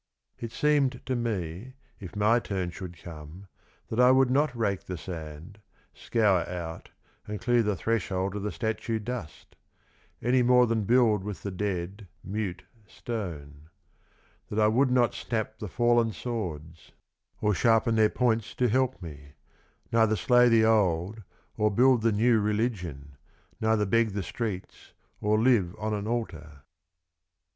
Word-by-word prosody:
It 115 Hz, -1 st, -6 dB
seemed 140 Hz, -4 st, +1 dB
to 130 Hz, -, -1 dB
me, 110 Hz, 0 st, -4 dB, 0.2 s
if 95 Hz, -1 st, -9 dB
my 105 Hz, +3 st, +3 dB
turn 95 Hz, -6 st, -3 dB
should 90 Hz, -1 st, -8 dB
come, 85 Hz, +2 st, -10 dB, 0.4 s
that 115 Hz, -, -3 dB
I 125 Hz, 0 st, +7 dB
would 130 Hz, -1 st, +4 dB
not 140 Hz, -1 st, +1 dB
rake 100 Hz, -4 st, -1 dB
the 90 Hz, -, -5 dB
sand, 80 Hz, +3 st, -8 dB, 0.3 s
scour 105 Hz, -6 st, +2 dB
out, 85 Hz, -2 st, -6 dB, 0.4 s
and 105 Hz, -1 st, -4 dB
clear 120 Hz, 0 st, +2 dB
the 105 Hz, -2 st, 0 dB
threshold 95 Hz, -1 st, -1 dB
of 105 Hz, -, -3 dB
the 105 Hz, +1 st, -3 dB
statue 110 Hz, -1 st, -2 dB
dust; 110 Hz, -7 st, -7 dB, 0.6 s
any 125 Hz, +2 st, +2 dB
more 125 Hz, 0 st, +5 dB
than 110 Hz, -3 st, -1 dB
build 115 Hz, -3 st, +3 dB
with 105 Hz, -1 st, -6 dB
tho 100 Hz, -, -3 dB
dead, 95 Hz, +1 st, -4 dB, 0.2 s
mute, 100 Hz, -2 st, -4 dB, 0.2 s
stone; 80 Hz, -12 st, -7 dB, 0.8 s
that 105 Hz, -, -5 dB
I 105 Hz, -1 st, +4 dB
would 130 Hz, +5 st, +3 dB
not 125 Hz, -2 st, +3 dB
snap 110 Hz, -1 st, -4 dB
the 105 Hz, -, -5 dB
fallen 120 Hz, +1 st, +2 dB
swords, 85 Hz, -11 st, -6 dB, 0.5 s
or 105 Hz, -1 st, +1 dB
sharpen 115 Hz, +4 st, +3 dB
their 110 Hz, -1 st, +4 dB
points 115 Hz, -3 st, 0 dB
to 125 Hz, -1 st, +1 dB
help 130 Hz, -2 st, 0 dB
me, 75 Hz, -3 st, -10 dB, 0.6 s
neither 110 Hz, -1 st, +3 dB
slay 125 Hz, +4 st, +4 dB
the 115 Hz, -1 st, +5 dB
old, 100 Hz, -1 st, +1 dB, 0.4 s
or 105 Hz, 0 st, +3 dB
build 125 Hz, +3 st, +4 dB
the 115 Hz, +1 st, +2 dB
new 115 Hz, +2 st, +3 dB
religion, 95 Hz, -, -2 dB, 0.4 s
neither 110 Hz, -1 st, +2 dB
beg 115 Hz, +1 st, +2 dB
the 100 Hz, -1 st, -2 dB
streets, 105 Hz, -4 st, -6 dB, 0.3 s
or 105 Hz, +1 st, +2 dB
live 110 Hz, -8 st, +2 dB
on 110 Hz, +2 st, -2 dB
an 105 Hz, 0 st, -3 dB
altar. 80 Hz, -, -5 dB
105 Hz, 150 wpm, -27 LUFS, 90-120 Hz, 0.8 s, I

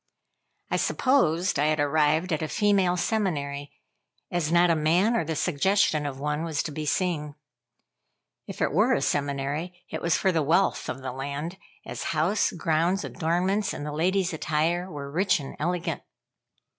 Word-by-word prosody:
I -, -, +2 dB
supposed 185 Hz, -, +2 dB
I 150 Hz, -, +3 dB
had 155 Hz, 0 st, +1 dB
arrived 155 Hz, +4 st, +2 dB
at 155 Hz, -, -1 dB
a 155 Hz, -, -1 dB
female 195 Hz, -2 st, +2 dB
seminary, 145 Hz, -9 st, -1 dB, 0.6 s
as 170 Hz, -3 st, -1 dB
not 175 Hz, 0 st, +5 dB
a -, -, +3 dB
man, 175 Hz, +9 st, +2 dB
or 230 Hz, -, +1 dB
the 160 Hz, 0 st, -3 dB
suggestion 160 Hz, -1 st, +1 dB
of 135 Hz, -1 st, -6 dB
one, 150 Hz, +2 st, -2 dB
was 160 Hz, -3 st, -1 dB
to 155 Hz, -, -5 dB
be 155 Hz, +1 st, -5 dB
seen. 150 Hz, -4 st, -1 dB, 1.1 s
If -, -, -3 dB
it -, -, +1 dB
were -, -, +4 dB
a -, -, -1 dB
seminary, 145 Hz, +5 st, -2 dB
it -, -, -4 dB
was 170 Hz, -1 st, +2 dB
for 190 Hz, -, +2 dB
the 165 Hz, -3 st, +1 dB
wealth 165 Hz, +7 st, +1 dB
of 130 Hz, +1 st, -5 dB
the 130 Hz, -, -3 dB
land, 140 Hz, +7 st, -5 dB, 0.3 s
as -, -, -6 dB
house, 185 Hz, +7 st, +2 dB
grounds, 170 Hz, +4 st, 0 dB
adornments, 185 Hz, +5 st, 0 dB
and 145 Hz, -, -5 dB
the 150 Hz, -, -4 dB
ladies' 180 Hz, +4 st, 0 dB
attire 160 Hz, +4 st, 0 dB
were 140 Hz, -4 st, -7 dB
rich 185 Hz, +4 st, +2 dB
and 135 Hz, -1 st, -8 dB
elegant. 175 Hz, +2 st, -2 dB
160 Hz, 170 wpm, -26 LUFS, 150-180 Hz, 1.1 s, not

